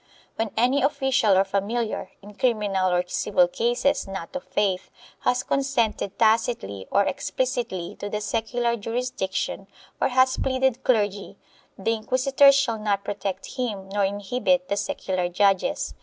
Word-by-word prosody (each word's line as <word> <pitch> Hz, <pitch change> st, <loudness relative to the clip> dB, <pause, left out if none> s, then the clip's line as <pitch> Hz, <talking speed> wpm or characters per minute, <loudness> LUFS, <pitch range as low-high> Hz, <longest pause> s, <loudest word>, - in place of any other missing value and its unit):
When 225 Hz, 0 st, -1 dB
any 250 Hz, +5 st, +3 dB
official 265 Hz, -7 st, +2 dB
or 190 Hz, -, +5 dB
familiar, 200 Hz, +2 st, -2 dB
in 205 Hz, +1 st, -11 dB
criminal 205 Hz, -6 st, +1 dB
or 180 Hz, 0 st, +2 dB
civil 180 Hz, 0 st, +2 dB
cases 240 Hz, +7 st, 0 dB
not 195 Hz, +3 st, -7 dB
of 275 Hz, -, -5 dB
faith, 195 Hz, -3 st, -1 dB, 0.3 s
has 250 Hz, -, +1 dB
con -, -, 0 dB
sented 235 Hz, -7 st, -1 dB
tacitly 220 Hz, -, +1 dB
or 200 Hz, -, +3 dB
explicitly 245 Hz, -7 st, -2 dB
to 205 Hz, -, -5 dB
the 210 Hz, -, -2 dB
secular 235 Hz, +2 st, -1 dB
jurisdiction 215 Hz, -4 st, -3 dB, 0.3 s
or -, -, +4 dB
has 260 Hz, 0 st, +3 dB
pleaded 260 Hz, -1 st, 0 dB
clergy, 205 Hz, -5 st, 0 dB, 0.4 s
the 225 Hz, +4 st, 0 dB
inquisitors 265 Hz, +5 st, +4 dB
shall 230 Hz, -5 st, +1 dB
not 205 Hz, -2 st, 0 dB
protect 200 Hz, +2 st, -5 dB
him 205 Hz, -7 st, -3 dB
nor 200 Hz, +1 st, 0 dB
inhibit 245 Hz, +8 st, 0 dB
the 200 Hz, -, +1 dB
secular 185 Hz, -3 st, -2 dB
judges. 195 Hz, +1 st, +1 dB
215 Hz, 140 wpm, -24 LUFS, 195-255 Hz, 0.4 s, or